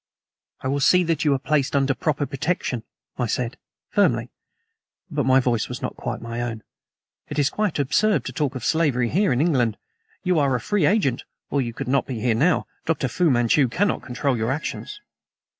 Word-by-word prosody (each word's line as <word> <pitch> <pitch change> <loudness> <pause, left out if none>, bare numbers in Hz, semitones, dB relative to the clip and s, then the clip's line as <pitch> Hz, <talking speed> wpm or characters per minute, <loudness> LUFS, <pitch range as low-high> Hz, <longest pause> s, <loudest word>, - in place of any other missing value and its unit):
"I - - -3
will 140 +2 0
see 180 +6 +5
that 165 -3 0
you 150 - +4
are - - +1
placed 140 0 0
under 135 0 +3
proper 145 0 -1
protection," 140 -4 -2 0.4
I 125 - +1
said 120 +2 -2 0.4
firmly, - - +2 0.8
but 145 -4 0
my 130 0 +6
voice 120 -3 0
was - - -5
not - - -3
quite - - -4
my 115 +1 -4
own. 115 -2 -4 0.7
"It 145 - -5
is 145 -1 +2
quite 210 -5 -1
absurd 205 +10 +2
to - - -5
talk 145 -3 -1
of 125 - -5
slavery 135 -7 +2
here 195 - +2
in 125 - +1
England. 125 -9 +2 0.5
You 180 -4 +2
are 140 -3 +2
a - - 0
free 205 - +1
agent, 180 - +1 0.3
or 140 - +2
you 120 -2 -3
could 135 +3 -6
not 135 +1 +1
be 125 -5 -4
here 120 +1 +2
now. 150 +11 +2 0.2
Dr. 160 -4 +1
Fu 165 +7 +1
Manchu 125 +2 +3
cannot 195 - 0
control 130 +1 -1
your 115 +1 -1
actions." 160 - -4
135 Hz, 195 wpm, -23 LUFS, 125-160 Hz, 0.8 s, my